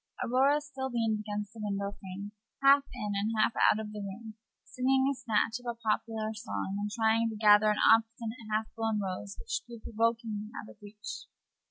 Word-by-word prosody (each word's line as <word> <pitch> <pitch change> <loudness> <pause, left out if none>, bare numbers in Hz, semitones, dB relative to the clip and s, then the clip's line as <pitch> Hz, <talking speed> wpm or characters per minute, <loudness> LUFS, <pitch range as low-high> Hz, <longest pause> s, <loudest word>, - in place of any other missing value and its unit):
Aurora 270 +4 +3
still 275 -3 -5
leaned 225 -3 0
against 210 -1 -4
the 225 - -11
window 200 -1 -2
frame, 195 +2 -7 0.3
half 275 +1 +7
in 210 -1 -4
and 210 +3 0
half 215 - +3 0.2
out 215 - 0
of 215 -1 -5
the 210 - -6
room, 210 +3 -7 0.3
singing 265 +1 +1
a 280 - +2
snatch 225 -3 0
of 245 - -12
a 235 -1 -3
popular 220 -1 -1
song, 100 - -4
and 205 0 -2
trying 225 +1 +2
to 220 - -5
gather 210 0 +6
an 210 - +1 0.2
obstinate 225 +1 -1
half 215 +1 +1
blown 225 -2 0
rose 195 +1 -4
which - - -3
grew 235 -1 -9
provokingly 225 -1 -1
out 110 - -9
of - - -18
reach. 205 0 -8
220 Hz, 190 wpm, -30 LUFS, 210-230 Hz, 0.3 s, half